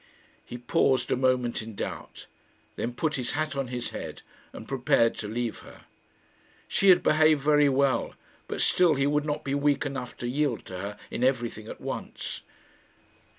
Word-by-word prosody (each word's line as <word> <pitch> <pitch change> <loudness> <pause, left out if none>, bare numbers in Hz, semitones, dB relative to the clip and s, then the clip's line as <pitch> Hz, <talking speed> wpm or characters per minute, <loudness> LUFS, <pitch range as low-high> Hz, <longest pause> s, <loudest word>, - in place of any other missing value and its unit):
He 120 - -8
paused 125 +1 +1
a - - +4
moment 125 -2 +1
in 110 -1 -9
doubt, - - -6 0.5
then 120 - -2
put 150 +2 -1
his 125 -2 -3
hat 155 0 -1
on 135 -1 -2
his 120 0 -4
head - - -7 0.3
and 110 - -10
prepared 125 -3 +2
to 105 - -4
leave 115 +1 -3
her. - - -14 0.9
She 195 - +3
had 180 - +7
behaved 155 -1 +4
very 150 -1 +5
well, 135 -3 +1 0.3
but - - -3
still 175 -4 +4
he 135 0 +1
would 150 +1 +1
not 150 -1 -2
be 135 - -2
weak 145 0 +1
enough 135 -3 -5
to 120 - -4
yield 135 -2 -1
to 90 -1 -7
her 100 +2 -5
in 120 - -2
everything 120 -4 0
at - - -8
once. - - -5
130 Hz, 175 wpm, -27 LUFS, 120-145 Hz, 0.9 s, had